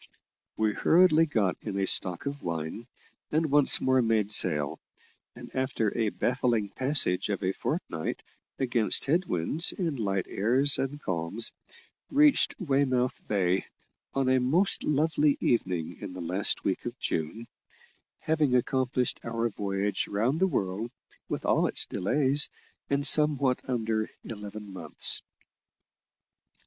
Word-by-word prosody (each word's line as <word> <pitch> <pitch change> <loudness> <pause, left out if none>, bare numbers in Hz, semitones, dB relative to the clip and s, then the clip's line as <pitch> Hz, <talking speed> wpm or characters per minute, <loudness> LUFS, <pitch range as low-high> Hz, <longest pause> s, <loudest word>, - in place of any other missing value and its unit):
We 110 -1 +1
hurriedly 165 - +4
got 105 -10 0
in 100 -3 -5
a 100 - +1
stock 90 +1 +2
of 140 0 -4
wine, 85 +7 -5 0.4
and 155 -1 0
once 145 -1 +5
more 130 0 +2
made 110 -3 +1
sail, 75 -8 +2 0.6
and - - -12
after 130 -5 -1
a 110 -3 +1
baffling 120 -3 0
passage 130 -9 +1
of 100 -1 -2
a 95 - +1
fortnight, 95 - -4 0.3
against 120 -6 +1
head 170 +7 +1
winds 140 - +1
and 165 -8 -3
light 100 -3 -1
airs 130 +7 +1
and 135 +2 -3
calms, 95 - -2 0.6
reached 290 0 +4
Weymouth 135 - 0
Bay 95 -2 0 0.5
on 135 -1 +1
a 130 0 +3
most 165 +11 +1
lovely 150 0 +2
evening 90 -7 -1
in 100 -3 -7
the 90 - -8
last 90 +4 0
week - - -1
of - - -6
June, 80 +9 -3 0.8
having 150 -5 +1
accomplished 125 0 0
our 115 0 -1
voyage 100 -1 -2
round 115 +9 0
the 190 - +3
world, 100 - -2 0.4
with - - -4
all - - +2
its - - +1
delays, 135 +8 +1 0.4
in 140 0 0
somewhat 140 -3 +4
under 110 -3 -1
eleven 105 -2 -8
months. 85 -5 0
120 Hz, 135 wpm, -28 LUFS, 100-140 Hz, 0.8 s, once